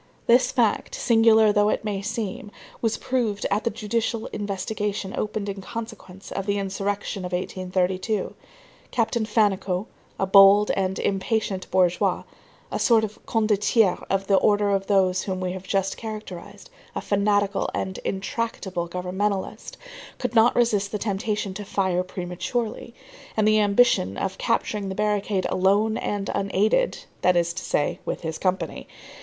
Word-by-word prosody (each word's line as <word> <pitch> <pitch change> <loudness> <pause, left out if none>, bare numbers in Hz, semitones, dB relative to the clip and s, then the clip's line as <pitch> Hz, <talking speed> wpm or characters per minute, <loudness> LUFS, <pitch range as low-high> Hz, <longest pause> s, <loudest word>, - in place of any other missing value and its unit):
This 240 +2 +4
fact, - - +1
singular 225 - +5
though 205 0 +3
it - - -1
may 200 -2 -2
seem, 210 -2 -4 0.3
was 225 -2 0
proved 230 -6 -1
at 205 +2 0
the - - +3
judicial 230 +1 -2
investigation 200 0 -3
opened 210 -1 -3
in 195 -1 -4
consequence 210 -3 -8
of 195 - -4
the 200 0 +1
insurrection 195 0 -3
of 180 0 -5
1832. 185 +3 -1 0.6
Captain 230 -2 0
Fannicot, 200 -3 +1 0.3
a 195 - +2
bold 195 +2 +7
and 190 0 -1
impatient 195 -1 -1
bourgeois, 180 -1 +2 0.5
a - - -2
sort 230 -2 +4
of 215 -1 -6
condottiere 215 -2 +2
of 195 0 0
the 195 0 +4
order 205 0 +3
of 195 -1 0
those 185 -2 +3
whom 185 -2 -3
we 185 -1 -2
have 190 0 -7
just 195 0 0
characterized, 215 - -8 0.2
a - - -1
fanatical 205 0 +1
and 190 0 -3
intractable 190 -3 -3
governmentalist, 190 +3 -3 0.4
could 250 -1 -3
not 230 +1 +5
resist 210 -4 +2
the 210 - -1
temptation 205 -1 -2
to 205 - -6
fire 190 -2 0
prematurely, 190 +7 -4 0.4
and 215 -1 +3
the 215 0 +5
ambition 205 - +3
of 190 -1 -3
capturing 210 -3 -1
the 190 - -4
barricade 205 -2 0
alone 205 +4 +2
and 205 -3 -2
unaided, 200 - +1 0.2
that 180 - +4
is 170 0 +1
to 185 - -5
say, 145 - 0
with - - -4
his 160 -1 -4
company. 185 0 -2
200 Hz, 150 wpm, -24 LUFS, 190-215 Hz, 0.6 s, bold